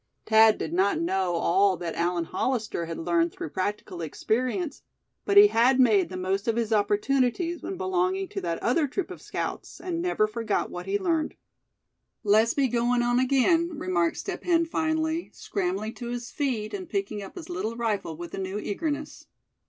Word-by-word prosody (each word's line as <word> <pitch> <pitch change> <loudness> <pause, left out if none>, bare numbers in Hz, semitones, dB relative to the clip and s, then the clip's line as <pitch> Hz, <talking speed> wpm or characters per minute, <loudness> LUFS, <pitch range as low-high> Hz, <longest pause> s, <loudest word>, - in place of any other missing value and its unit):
Thad 220 -1 +6
did 160 - -4
not 190 +3 +2
know 180 +1 0
all 185 +3 +3
that 170 -1 -4
Allan 175 0 0
Hollister 215 -3 -2
had 165 - -5
learned 170 0 +1
through - - -6
practical 185 -2 -3
experience; 255 - -2 0.4
but 400 - +2
he 405 - +11
had 255 - +4
made 210 -9 +4
the 185 - -6
most 190 +3 -1
of 230 - +2
his 230 -1 0
opportunities 255 - +1
when 380 - -5
belonging 375 +1 0
to 195 - -4
that 170 -2 -2
other 290 +5 +2
troop 355 +7 -3
of - - -9
scouts; - - -5
and 345 -1 -3
never 355 -12 +2
forgot 215 -1 -2
what 180 - -7
he 405 - +1
learned. 335 -5 -1 0.9
"Let's 215 +2 +4
be 280 - +3
agoin' 240 0 +1
on 245 +1 +2
again," 310 +6 +2
remarked 175 -7 0
Step 390 - -5
Hen, 335 -2 +3
finally, 320 0 -1
scrambling 200 +3 -3
to 240 - -7
his 240 0 -5
feet, 250 -8 -2
and 370 -4 -5
picking 390 - -2
up 195 - -9
his 345 -3 -8
little 230 -11 -3
rifle 210 -9 -2
with 170 0 -8
a - - -4
new 190 +1 -3
eagerness. 295 +8 -4
230 Hz, 180 wpm, -27 LUFS, 190-315 Hz, 0.9 s, he